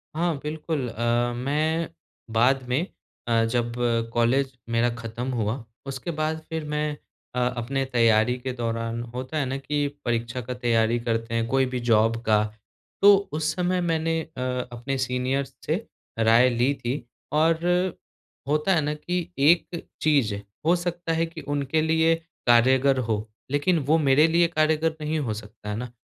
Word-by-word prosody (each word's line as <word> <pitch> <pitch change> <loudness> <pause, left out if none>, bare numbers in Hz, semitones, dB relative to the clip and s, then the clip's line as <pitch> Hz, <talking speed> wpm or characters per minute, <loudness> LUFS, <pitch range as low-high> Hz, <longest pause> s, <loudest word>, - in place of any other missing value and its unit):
हाँ 170 0 +1
बिल्कुल 150 -3 -3
अ, 120 +1 0
मैं 155 +6 0 0.4
बाद 130 +4 +3
में 135 +8 +1 0.4
अ, 115 -1 +3
जब 120 0 -1 0.4
कॉलेज 130 +3 +1
मेरा 115 +1 +2
खत्म 115 +2 -5
हुआ 115 +2 -1 0.2
उसके 135 +5 -4
बाद 155 +1 0
फिर 160 -1 -3
मैं 150 0 0 0.5
अ, - - 0 0.2
अपने 135 +3 -1
तैयारी 115 +1 +4
के 130 +1 -4
दौरान 115 -1 -2
होता 130 +5 -4
है 145 - +1
ना 130 +1 -2
कि 145 +1 -1 0.2
परीक्षा 120 +1 -1
का 125 +2 -5
तैयारी 120 -1 +1
करते 115 0 -2
हैं 115 0 0
कोई 135 +2 +2
भी 130 -1 -3
जॉब 115 +1 +4
का। 105 -2 +3 0.6
तो 205 0 +9 0.2
उस 155 0 0
समय 180 0 0
मैंने 165 -1 0
अ, 155 -4 -9 0.3
अपने 120 +3 -3
सीनियर्स 130 +1 -1
से 180 +9 -1 0.3
राय 115 +3 +5
ली 120 +3 +2
थी 120 +3 -2 0.3
और 160 +2 +3 0.9
होता 150 +6 +2
है 160 - +3
ना 150 0 -1
कि 175 +3 -3
एक 170 +3 +3 0.2
चीज़ 140 -9 +3 0.3
हो 170 +2 +5
सकता 175 -1 -2
है 165 +1 +1
कि 165 - -9
उनके 145 +1 0
लिए 160 +1 +3 0.3
कार्यगर 130 +3 +5
हो, 110 -3 -2 0.2
लेकिन 160 +4 +2
वो 155 +3 +4
मेरे 150 0 +5
लिए 170 +1 +4
कार्यगर 160 0 +1
नहीं 155 +1 -1
हो 120 -7 -2
सकता। 105 0 -9
है 105 - -2
ना? 120 +1 -5
135 Hz, 160 wpm, -25 LUFS, 120-155 Hz, 0.9 s, तो